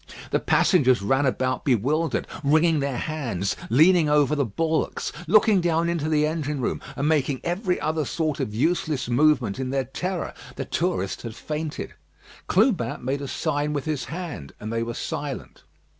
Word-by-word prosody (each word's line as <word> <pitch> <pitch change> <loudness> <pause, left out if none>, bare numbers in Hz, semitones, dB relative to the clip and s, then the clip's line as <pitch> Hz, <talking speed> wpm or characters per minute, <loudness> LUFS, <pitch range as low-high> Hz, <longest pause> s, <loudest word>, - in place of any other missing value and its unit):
The - - +2
passengers 130 - +3
ran 135 +6 +2
about 130 0 -1
bewildered, 145 +7 +1 0.2
wringing 155 +2 +4
their 140 -3 -1
hands, 120 - -2
leaning 160 +6 +5
over 150 0 +3
the 145 - +1
bulwarks, 160 +9 -1 0.2
looking 210 +1 +5
down 170 0 +1
in 170 0 0
the 150 -1 +3
engine 150 -2 -2
room, 125 - -2
and 140 +2 -1
making 145 -4 +1
every 180 +2 -1
other 155 0 0
sort 155 0 -2
of - - -2
useless 150 +2 0
movement 125 -4 +2
in 130 -1 -2
their 135 0 0
terror. 180 +7 -3 0.2
The - - -4
tourist 95 +1 -1
had 115 -2 -7
fainted. 150 +4 -5 0.5
Clubin 185 - +1
made 135 +2 -1
a 140 - -4
sign 150 0 -1
with 145 -2 -2
his 155 -4 -2
hand, 160 - -6
and 110 +2 -5
they 115 - 0
were 115 0 -3
silent. 145 -5 -5
150 Hz, 165 wpm, -24 LUFS, 130-160 Hz, 0.5 s, leaning